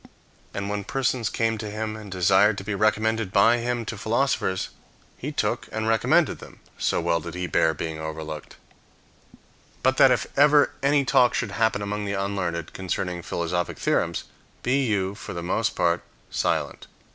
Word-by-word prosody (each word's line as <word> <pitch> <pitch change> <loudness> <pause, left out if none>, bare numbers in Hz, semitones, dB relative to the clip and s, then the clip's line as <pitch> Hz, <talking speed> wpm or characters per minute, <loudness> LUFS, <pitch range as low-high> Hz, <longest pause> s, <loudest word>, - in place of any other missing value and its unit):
And 100 0 -4
when 100 0 -2
persons 125 0 0
came 115 -1 0
to 105 -1 -4
him 110 +1 -3
and 105 -2 -9
desired 95 +3 +4
to 95 - -5
be 105 +1 -3
recommended 110 0 +1
by 115 +5 +5
him 120 0 -2
to 110 -1 -5
philosophers, 110 -5 0 0.5
he - - -5
took - - -1
and 110 0 -2
recommended 110 -1 +3
them, - - -13 0.2
so - - +1
well 85 - +1
did 75 - -7
he 90 0 -2
bear 80 -2 +2
being 80 +1 -4
overlooked. 80 0 -6 1.3
So - - +6
that - - +6
if - - +2
ever 145 +1 +5
any 140 0 +3
talk 125 -1 +4
should 115 -4 -1
happen 110 -1 +1
among 105 +1 -3
the 100 - -2
unlearned 95 -4 -2
concerning 90 -1 -3
philosophic 85 +1 -2
theorems, - - 0 0.4
be 135 +3 +2
you, 100 -4 0
for 100 - -8
the 85 - -4
most 110 +5 0
part, 85 -1 +2 0.3
silent. - - -1
105 Hz, 170 wpm, -25 LUFS, 90-115 Hz, 1.3 s, So